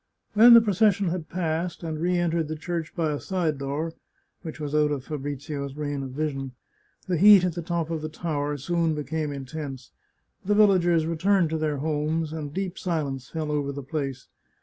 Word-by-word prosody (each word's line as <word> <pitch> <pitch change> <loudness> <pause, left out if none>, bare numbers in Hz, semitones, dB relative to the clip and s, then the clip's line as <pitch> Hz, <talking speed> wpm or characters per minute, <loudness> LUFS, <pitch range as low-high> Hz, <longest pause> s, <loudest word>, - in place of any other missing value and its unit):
When 235 +3 +9
the 230 - +9
procession 205 -2 +2
had 170 -2 -4
passed, 170 0 -2
and 160 -2 -4
re 180 +1 +1
entered 170 -2 0
the 155 - -4
church 165 0 -4
by 160 -3 0
a 145 - -2
side 170 -6 -1
door, 145 +4 -3 0.5
which 160 -1 -8
was 150 -1 -4
out 150 0 +3
of 145 -3 -2
Fabrizio's 140 -1 -5
range 145 -2 -3
of 135 - -5
vision, 135 -1 -3 0.5
the 180 -4 0
heat 200 0 +8
at 180 -2 0
the 170 - -4
top 170 -1 -2
of 160 -2 -2
the 155 - -4
tower 150 -3 -2
soon 165 +2 0
became 150 0 -3
in 140 -1 -6
tense. 135 -3 -7 0.5
The 205 +2 +1
villagers 175 -6 +4
returned 170 +1 +2
to 160 - -1
their 155 -2 -1
homes, 155 +2 -1
and 150 -3 -5
deep 190 +2 -4
silence 145 -7 -3
fell 155 -2 -3
over 145 -1 -1
the 140 0 -6
place. 135 -2 -4
155 Hz, 195 wpm, -26 LUFS, 145-175 Hz, 0.5 s, When